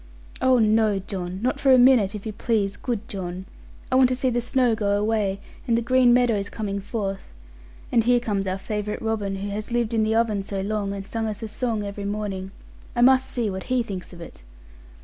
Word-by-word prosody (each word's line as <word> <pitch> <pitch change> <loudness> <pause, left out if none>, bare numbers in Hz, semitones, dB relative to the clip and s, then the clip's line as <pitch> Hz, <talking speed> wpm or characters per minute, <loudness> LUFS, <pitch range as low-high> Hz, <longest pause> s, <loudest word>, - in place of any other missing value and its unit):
'Oh, 260 -1 +4
no, 215 -2 +3
John! 185 -1 -5
Not 255 - 0
for 275 - +4
a 260 - +8
minute, 245 -5 +5
if 210 - -7
you 215 - -4
please, 205 -2 0
good 230 -3 -4
John. 185 -1 -5 0.5
I - - +2
want 260 -1 +6
to 255 - +1
see 260 0 0
the 240 0 0
snow 245 -1 +2
go 205 -2 +1
away, 210 -2 0 0.3
and 230 -1 +3
the - - +1
green 255 0 +4
meadows 235 -5 +2
coming 200 -2 -3
forth. 195 - -5 0.6
And 230 - +4
here 245 +1 +4
comes 200 -4 -2
our 185 0 -1
favourite 210 +1 -4
robin, 210 -3 -1
who 195 +1 -4
has 210 +3 -5
lived 235 -1 0
in 225 - +2
the 220 +1 +1
oven 225 -3 +1
so 195 0 -4
long, 205 0 -2
and 195 -1 -6
sang 225 +2 -3
us 215 +1 -5
a - - -3
song 220 0 -2
every 200 0 -5
morning. 200 -2 -3 0.5
I 240 - +3
must 265 +1 +5
see 240 -4 -1
what 190 0 -6
he 255 -1 +2
thinks 195 -5 -7
of 175 -1 -11
it!' 115 - -11
215 Hz, 220 wpm, -24 LUFS, 200-240 Hz, 0.6 s, a